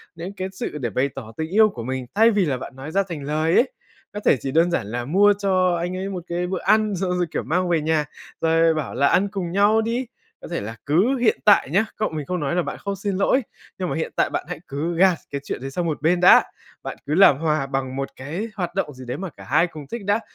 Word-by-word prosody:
đến 170 +4 -7
cái 185 - -2
sự 190 -5 -5
để 120 -5 -2
bày 130 +7 0
tỏ 115 -5 -8
tình 160 0 -3
yêu 215 +3 +5
của 120 - -7
mình, 130 +1 -3
thay 225 +2 +6
vì 200 -4 +2
là 135 -4 -1
bạn 130 - -9
nói 135 +4 -8
ra 195 +3 +2
thành 150 -4 -5
lời 155 +3 0
ấy. 255 - +3 0.4
Có 205 - -4
thể 205 - +3
chỉ 135 - -3
đơn 165 +4 +3
giản 115 -11 -1
là 120 +3 -4
mua 200 +8 +4
cho 185 -3 +2
anh 175 +2 -3
ấy 195 +1 -3
một 180 -3 -5
cái 175 +1 -2
bữa 185 0 -2
ăn, 215 -2 +3
xong 185 0 -2
rồi, 175 - +1
kiểu, - - -2
mang 180 +2 0
về 165 -3 +2
nhà, 155 -1 +1 0.4
rồi 165 0 +3
bảo 155 -5 -3
là 140 +2 +3
"Ăn 200 +7 +3
cùng 190 -4 -4
nhau 205 +4 +4
đi." 235 +3 -2 0.3
Có - - -9
thể 170 - -3
là 110 +2 -6
cứ 190 - +3
hiện 240 -2 +2
tại 205 -9 +5
nhá, 195 +8 +2
cậu 215 - -1
mình 155 -2 -5
không 180 +4 -2
nói 150 +2 -1
là 180 - +2
bạn - - -5
không 200 -1 -4
xin 200 0 -3
lỗi, 225 +7 +2 0.3
nhưng 185 -2 -2
mà - - -2
hiện 160 - -3
tại - - +2
bạn - - -3
hãy 180 - -5
cứ 160 +5 -3
gạt 185 0 +5 0.2
cái 140 - -3
chuyện - - -5
đấy 135 +1 -5
sang 175 +4 -2
một 155 -3 -2
bên 170 +3 +2
đã, 180 - +7 0.4
bạn - - -6
cứ 145 - -2
làm 185 -7 +7
hòa 155 -2 0
bằng 135 -1 -3
một 135 0 -3
cái 160 - -5
hoạt 180 -3 -4
động 170 -6 -1
gì 130 0 -11
đấy 125 +3 -4
mà 190 +2 -5
cả - - -14
hai 155 +6 +2
cùng 155 -4 -10
thích 225 +5 -6
đã. 205 +2 +2
170 Hz, 275 wpm, -22 LUFS, 145-195 Hz, 0.4 s, đã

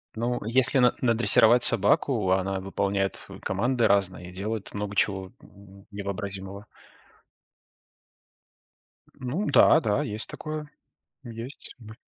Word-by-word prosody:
Ну, 120 +2 -2
если 130 +3 +4
на 125 0 +4
надрессировать 120 0 +4
собаку, 105 -1 +2
она 95 0 0
выполняет, 95 0 -2
э, - - -10
команды 120 +5 0
разные, 95 -3 0
и - - -13
делает 105 +2 -5
много 105 0 -5
чего 95 -2 -1
н 100 0 -17
невообразимого. 100 0 -6 2.5
Ну 140 +12 -3
да, 160 - +6
да, 105 -8 0
есть 105 +1 -2
такое. 155 -1 -6 0.5
Есть 120 +3 -9
б 110 -1 -12
105 Hz, 115 wpm, -26 LUFS, 95-120 Hz, 2.5 s, да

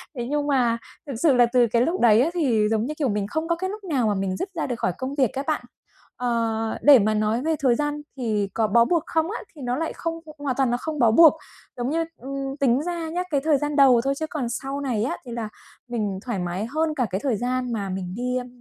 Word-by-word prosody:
Thế 240 -2 -3
nhưng 295 0 0
mà 245 -5 +2 0.3
thực 275 - -4
sự 275 +5 +3
là 245 -1 +6
từ 245 -2 +5
cái 235 -1 +3
lúc 335 +8 0
đấy 225 -1 +6
á 290 - +2
thì 265 -11 +2
giống 220 0 +1
như, 300 - -3
kiểu, 280 -5 0
mình 205 -1 -1
không 315 +8 -3
có 335 - +1
cái 375 +2 -3
lúc 420 +1 -7
nào 275 - 0
mà 205 - +1
mình 190 -1 -2
dứt 385 - -3
ra 325 - -2
được 245 -2 -4
khỏi 180 - 0
công 260 +2 -4
việc 265 -6 +2
á 270 - -3
bạn. 310 - 0 0.5
Ờ, 230 -2 -1
để 280 -4 +8
mà 215 +1 +2
nói 215 +2 0
về 320 +3 0
thời 255 -4 +3
gian 295 +2 -2 0.2
thì 210 -5 -1
có 220 -1 +1
bó 235 +3 +4
buộc 335 +1 +1
không 325 +2 0
á, 455 - -4 0.2
thì 295 - -11
nó 245 -1 -1
lại 325 +1 -2
không 330 -1 -4 0.2
hoàn 280 -3 -2
toàn 265 -3 +2
nó 245 - +1
không 310 -2 -4
bó 230 -2 +5
buộc. 320 +6 +8 0.4
Giống 245 +1 -2
như 330 +2 0
ừm, 275 +1 -5
tính 265 -1 +3
ra 340 -1 -3
nhá, 350 +3 -2
cái 285 -2 +1
thời 310 -2 +3
gian 295 +1 -2
đầu 265 -4 +6
thôi 275 +3 0
chứ 315 - -1
còn 260 -6 -3
sau 270 +3 -4
này 245 -6 -1
á 250 - -2
thì 245 - -8
là 230 -2 -4 0.4
mình 210 -5 -2
thoải 240 -6 -2
mái 180 +3 -3
hơn 310 +6 -1
cả 255 -4 +1
cái 190 +2 -3
thời 255 -6 +1
gian 250 +1 -2
mà 200 -3 -3
mình 185 -1 -4
đi, 250 +2 -1
ưm, 250 -1 -4
255 Hz, 270 wpm, -24 LUFS, 230-295 Hz, 0.5 s, để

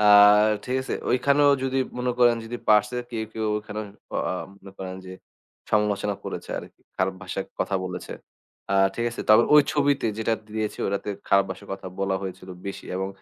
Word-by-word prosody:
আ - - +3 0.6
ঠিক 130 +1 -1
আছে? - - -3 0.2
ওইখানেও 140 +3 +4
যদি 135 0 0 0.2
মনে 125 0 0
করেন 120 -1 +5
যদি 120 +2 -5
পারছে 105 +3 +4
কেউ, 110 -2 -3
কেউ, 110 -1 -2
ওখানে 105 0 -6 0.3
অ - - +1
আ - - 0 0.3
মনে 95 - -12
করেন 95 -1 -5
যে, 90 - -8 0.6
সমালোচনা 105 -1 +1
করেছে - - -6
আরকি। - - -11 0.2
খারাপ 95 0 0
ভাষায় 95 +1 -4
কথা 100 - -1
বলেছে। 90 -1 -6 0.6
আ - - +1 0.2
ঠিক 115 - -2
আছে? 115 - -6
তারপর 110 +2 +7
ওই 150 - +9
ছবিতে 145 -4 +2
যেটা 110 0 +1 0.2
দিয়েছি 110 -1 -2
ওটাতে 100 +1 -2 0.2
খারাপ 100 0 +5
ভাষায় 100 - -8
কথা 95 - -7
বলা 95 -1 +1
হয়েছিল 95 0 -7 0.2
বেশি 100 - -6
এবং 95 +1 -2
105 Hz, 180 wpm, -25 LUFS, 95-120 Hz, 0.6 s, ওই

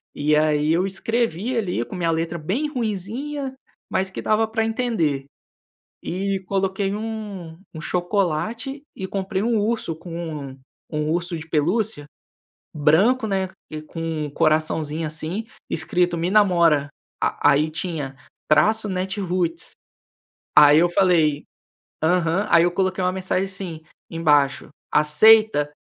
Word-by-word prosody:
e 150 +1 +2
aí 150 0 +2
eu 175 +3 +2
escrevi 225 +3 -1
ali 180 - -1
com 120 - -8
minha 170 -2 +1
letra 165 +1 -2
bem 220 - -2
ruinzinha, 255 - -3 0.4
mas 190 0 0
que 190 - -6
dava 220 +1 +2
para 225 0 -1
entender, 220 - -1 0.8
e 195 +2 -2
coloquei 195 +1 -1
um 205 -6 -6 0.2
um 160 - -6
chocolate 200 - -2
e 190 - -4
comprei 190 0 -2
um 230 0 +1
urso 210 -6 -1
com 170 +2 -11 0.4
um 135 +1 -14 0.3
um 150 -1 -2
urso 170 +1 -1
de 160 0 -8
pelúcia, 165 +2 0 0.7
branco, 190 - +3
né, 190 -2 0 0.2
e 155 0 -5
com 160 -1 -4
coraçãozinho 155 +1 0
assim 160 +7 -4 0.2
escrito: 175 +1 0
"Me 170 +2 -1
namora", 170 -8 +4 0.3
a - - +3
aí 150 +3 +2
tinha 155 -5 -4 0.3
traço 215 +7 +3
Natiruts. 185 -3 -2 0.9
Aí 150 0 +8
eu 175 - +4
falei 170 -6 +2 0.6
aham, 175 +3 +2
aí 165 - +6
eu 175 - +2
coloquei 185 +1 0
uma 180 - +2
mensagem 185 0 -1
assim 190 -5 -6 0.3
embaixo: 150 -5 +2 0.2
"Aceita?" 150 +1 +5
180 Hz, 130 wpm, -22 LUFS, 155-205 Hz, 0.9 s, Aí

